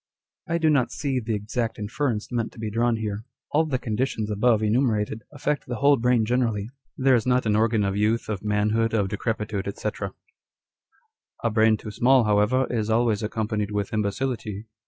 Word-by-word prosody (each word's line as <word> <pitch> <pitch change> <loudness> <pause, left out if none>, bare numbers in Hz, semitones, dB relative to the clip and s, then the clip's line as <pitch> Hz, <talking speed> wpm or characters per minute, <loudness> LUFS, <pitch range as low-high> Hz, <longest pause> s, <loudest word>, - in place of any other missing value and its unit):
I 170 - +1
do 160 -2 +3
not 135 -5 +2
see 135 -3 -1
the 110 -2 -2
exact 110 +2 -3
inference 115 +1 -2
meant 115 -2 -1
to 120 - -13
be 110 -1 -3
drawn 115 +2 +2
here. 105 -1 -4 0.3
All 160 +2 +3
the 140 -4 -1
conditions 110 -2 -2
above 110 +1 +2
enumerated 110 -1 +1
affect 145 0 -2
the 120 - -3
whole 140 +4 +4
brain 120 -2 +2
generally. 115 -3 0 0.3
There 135 0 +4
is 120 -1 +2
not 125 -1 +2
an 105 -1 +2
organ 110 0 +2
of 100 0 -1
youth, 110 +3 +1
of 105 -2 -4
manhood, 105 +2 +1
of 100 -3 +1
decrepitude, 105 -1 -2
&c. - - -1 0.8
" - - -35
A 115 - +2
brain 110 0 +4
'too 105 - -8
small, 125 +3 +4
however, 105 +5 +2
is 110 -2 -1
always 110 -1 +2
accompanied 105 -1 -2
with 105 0 -3
imbecility. 110 0 -2
110 Hz, 180 wpm, -25 LUFS, 105-125 Hz, 0.8 s, whole